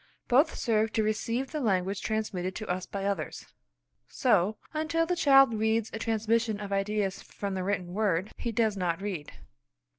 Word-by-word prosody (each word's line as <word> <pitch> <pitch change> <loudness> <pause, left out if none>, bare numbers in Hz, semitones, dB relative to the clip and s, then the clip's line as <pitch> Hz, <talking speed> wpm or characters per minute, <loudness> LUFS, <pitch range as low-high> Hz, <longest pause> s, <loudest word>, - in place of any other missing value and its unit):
Both 270 +6 +4
serve 220 -2 +1
to 220 - +2
receive 230 +4 -1
the 305 - -2
language 195 -5 0
transmitted 195 -4 -2
to 215 - -5
us 180 0 -2
by 195 -1 -4
others. 195 -6 -3 0.6
So, 200 +5 +2 0.2
until 315 +2 0
the 360 +2 0
child 270 -7 +6
reads 220 0 0
a 220 - -4
transmission 225 0 0
of 205 -1 -6
ideas 195 -1 -1
from 200 -1 -5
the 185 -1 -2
written 185 -2 -2
word, 200 -2 0
he 235 - -3
does 220 -2 +1
not 175 -3 -1
read. 190 -7 -4
215 Hz, 170 wpm, -29 LUFS, 195-230 Hz, 0.6 s, child